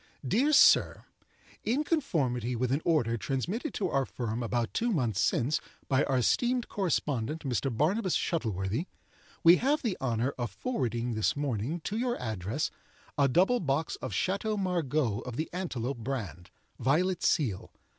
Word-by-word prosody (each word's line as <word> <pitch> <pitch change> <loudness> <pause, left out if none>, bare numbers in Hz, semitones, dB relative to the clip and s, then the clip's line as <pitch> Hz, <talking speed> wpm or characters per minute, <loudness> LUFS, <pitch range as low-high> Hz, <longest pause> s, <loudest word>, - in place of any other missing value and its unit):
"Dear 255 - +3
Sir—In 275 -2 +2
conformity 135 - 0
with 125 +1 -1
an 140 +4 +1
order 120 -9 +2
transmitted 170 - -2
to 190 -4 -1
our 135 -3 0
firm 115 -1 -3
about 120 0 -1
two 235 +1 0
months 120 - 0
since, 125 +7 +1 0.3
by 135 0 +3
our 135 - +1
esteemed 240 - +1
correspondent, 155 - -1
Mr. 135 0 -1
Barnabus 180 - +1
Shuttleworthy, 110 - -2 0.6
we 170 +2 +8
have 285 +4 +1
the 220 -7 0
honor 125 +1 0
of 120 - -1
forwarding 120 - -2
this 110 -1 +1
morning, 145 +3 -2
to 205 +6 -3
your 245 0 -1
address, 110 - -2 0.4
a 140 -1 +4
double 185 - +3
box 155 0 -1
of - - -5
Chateau 205 +3 -1
Margaux 155 - 0
of 125 -2 -7
the 155 +5 -3
antelope 135 -9 -3
brand, 105 - -5 0.3
violet 170 +8 +1
seal. 115 - 0
140 Hz, 145 wpm, -30 LUFS, 120-185 Hz, 0.6 s, we